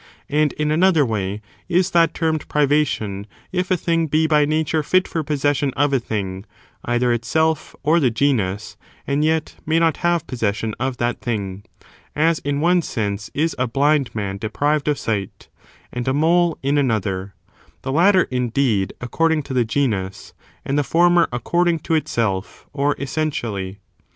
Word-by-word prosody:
And 150 0 +2
in 150 0 -1
another 165 -2 +4
way 105 -2 -3 0.3
is 185 +1 +2
that 170 -1 +3
termed 160 -2 -1
privation 140 -9 0 0.2
if 180 0 -1
a 185 - +2
thing 165 -1 0
be 155 +2 +2
by 150 -2 +4
nature 155 +1 0
fit 185 +5 +2
for 160 - -2
possession 145 -1 0
of 145 0 +2
a 135 - +3
thing, 95 -5 -4 0.4
either 120 0 +1
itself 160 +7 0
or 160 +4 +4
the 135 -6 +3
genus, 110 -6 -1 0.3
and 140 +2 0
yet 160 0 0
may 160 +1 +1
not 165 -1 +2
have 170 -2 +1
possession 110 -2 -2
of 130 0 -2
that 120 +1 -1
thing; 100 -5 -3 0.5
as 160 +1 +2
in 145 0 -2
one 175 +2 +3
sense 105 -7 -3
is 160 +2 0
a 125 - +1
blind 140 +1 +1
man 100 -2 -3
deprived 145 +8 0
of 150 -1 +2
sight, 105 -6 -4 0.4
and 120 0 -4
a 130 - +1
mole 170 +2 +3
in 140 +2 +2
another: 100 -7 -1 0.5
the 135 - -3
latter, 185 +5 +5
indeed, 125 -5 0
according 160 +5 +1
to 135 - -6
the 125 -2 +3
genus, 105 -7 -2 0.3
and 140 +2 0
the - - +2
former 175 +3 +3
according 170 +8 +1
to 160 - -3
itself, 110 -10 -1
or 145 0 +1
essentially. 115 -10 -3
140 Hz, 160 wpm, -21 LUFS, 115-160 Hz, 0.5 s, latter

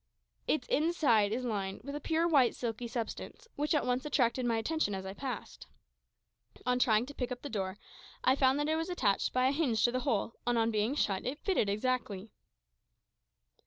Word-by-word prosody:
Its 300 -5 0
inside 280 -10 +3
is 250 +3 -2
lined 195 -4 -3
with 280 +2 -6
a - - -3
pure 325 +3 +1
white 275 -7 +4
silky 235 0 -3
substance, 235 - -5
which 300 +2 0
at 295 - +1
once 250 +1 0
attracted 255 -4 +1
my 230 -1 +2
attention 225 -3 0
as 190 0 -5
I 190 - -5
passed. 255 +1 -6 1.0
On 250 0 +2
trying 230 -2 +3
to 285 - -9
pick 250 -2 -3
up 245 - -5
the 285 - -5
door, 190 -2 -3 0.5
I 260 - +5
found 265 0 +3
that 295 - 0
it 315 - +2
was 325 +2 -2
attached 215 - +1
by 255 0 +2
a - - +3
hinge 275 -8 +1
to 240 - +3
the 255 - 0
hole, 230 -4 0
and 240 -1 +2
on 225 0 +2
being 215 +5 0
shut 195 -9 0
it 260 +4 -3
fitted 365 - +2
exactly. 215 -2 -2
250 Hz, 200 wpm, -32 LUFS, 220-285 Hz, 1.0 s, I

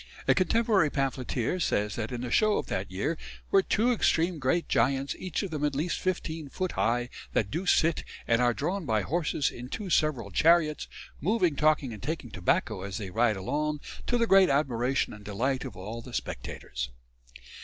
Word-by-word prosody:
A - - +6
contemporary 200 -3 +3
pamphleteer 135 +2 -1
says 105 -10 0
that 110 0 -3
in 120 -1 -4
the 125 -1 -4
Show 215 - +4
of - - -2
that 95 +1 -3
year 140 - -2 0.3
were 195 - +6
"two 225 +5 +2
extreme 175 -7 +2
great 145 +6 +1
giants, 135 +1 +1
each 185 +2 -2
of 195 - -4
them 150 -2 -3
at 145 -2 +1
least 160 +5 -1
15 160 -5 -3
foot 185 +5 -2
high, 120 +1 +1 0.3
that 105 -3 +1
do 180 +3 -3
sit, 165 -2 +3 0.2
and 115 +1 +3
are 120 -1 +4
drawn 165 +7 -2
by 110 -2 +1
horses 155 -3 0
in 125 +1 -8
two 200 +1 -5
several 135 -11 +1
chariots, 155 - +3 0.3
moving, 180 -3 +2
talking, 150 -4 +2
and 105 - -9
taking 150 -7 -4
tobacco 95 +2 0
as 100 +1 -5
they 100 -5 -5
ride 110 0 +2
along, 150 +9 -1 0.3
to 245 - +2
the 235 - +3
great 195 -4 +6
admiration 135 -2 +1
and 105 -1 -11
delight 125 +6 -1
of - - -8
all 105 +5 -6
the 120 0 -8
spectators." 60 0 -4
140 Hz, 185 wpm, -28 LUFS, 115-170 Hz, 0.3 s, A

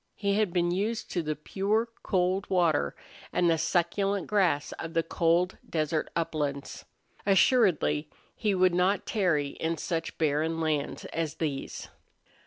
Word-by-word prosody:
He 200 -1 0
had 210 -2 +1
been 175 -1 +1
used 210 +5 -2
to 175 - 0
the 155 -1 -2
pure, 205 +9 0
cold 185 +1 0
water 175 -5 +2 0.4
and 180 - +2
the 165 -1 +3
succulent 190 +3 +1
grass 180 -8 +1
of 165 +1 -6
the 165 - +3
cold 170 +2 +1
desert 155 -1 -1
uplands. 145 -4 -3 0.4
Assuredly 185 - +3 0.3
he 210 -4 0
would 185 -1 +4
not 185 +3 +2
tarry 170 -9 +1
in 165 +3 -3
such 165 0 -3
barren 160 +1 +1
lands 155 -3 -1
as 160 -4 -2
these. 145 -4 -4
170 Hz, 140 wpm, -28 LUFS, 155-195 Hz, 0.4 s, would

